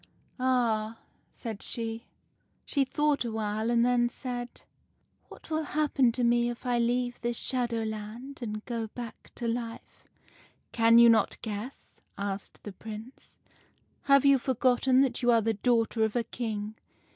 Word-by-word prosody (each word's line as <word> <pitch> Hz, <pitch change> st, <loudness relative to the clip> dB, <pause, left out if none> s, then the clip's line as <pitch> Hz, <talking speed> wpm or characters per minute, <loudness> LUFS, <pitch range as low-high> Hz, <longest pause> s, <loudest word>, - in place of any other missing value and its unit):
" -, -, -36 dB
' -, -, -36 dB
Ah! 230 Hz, -4 st, +1 dB, 0.2 s
' -, -, -41 dB
said 225 Hz, -4 st, -7 dB
she. 230 Hz, 0 st, -3 dB, 0.6 s
"She 280 Hz, -, +2 dB
thought 295 Hz, +1 st, +1 dB
awhile, 220 Hz, -1 st, -2 dB
and 235 Hz, 0 st, +3 dB
then 245 Hz, -1 st, +3 dB
said, 245 Hz, -1 st, -6 dB, 0.2 s
— -, -, -42 dB
" -, -, -44 dB
' -, -, -41 dB
What -, -, -14 dB
will 315 Hz, 0 st, +1 dB
happen 295 Hz, -5 st, +2 dB
to 245 Hz, -, -1 dB
me 240 Hz, 0 st, +3 dB
if 240 Hz, +2 st, -7 dB
I 245 Hz, -1 st, +1 dB
leave 245 Hz, +1 st, 0 dB
this 240 Hz, 0 st, -1 dB
Shadowland, 230 Hz, +1 st, -3 dB
and 215 Hz, -2 st, -5 dB
go 230 Hz, -3 st, -3 dB
back 235 Hz, +1 st, -9 dB
to 240 Hz, -, -3 dB
life? 230 Hz, 0 st, -5 dB
' -, -, -31 dB
" -, -, -28 dB
' -, -, -44 dB
Can 230 Hz, 0 st, +5 dB
you 235 Hz, 0 st, +9 dB
not 225 Hz, -1 st, +4 dB
guess? 220 Hz, +4 st, -7 dB
' -, -, -40 dB
asked 195 Hz, 0 st, -8 dB
the 205 Hz, -, -7 dB
Prince. 220 Hz, +5 st, -10 dB, 0.4 s
' -, -, -41 dB
Have 275 Hz, 0 st, +6 dB
you 275 Hz, -1 st, +6 dB
forgotten 255 Hz, +1 st, +3 dB
that 265 Hz, -2 st, 0 dB
you 245 Hz, -, +2 dB
are 230 Hz, -1 st, +5 dB
the 225 Hz, +1 st, +1 dB
daughter 230 Hz, 0 st, +1 dB
of 220 Hz, +1 st, 0 dB
a 240 Hz, -, +2 dB
King? 215 Hz, -2 st, -4 dB
235 Hz, 185 wpm, -29 LUFS, 225-250 Hz, 0.6 s, you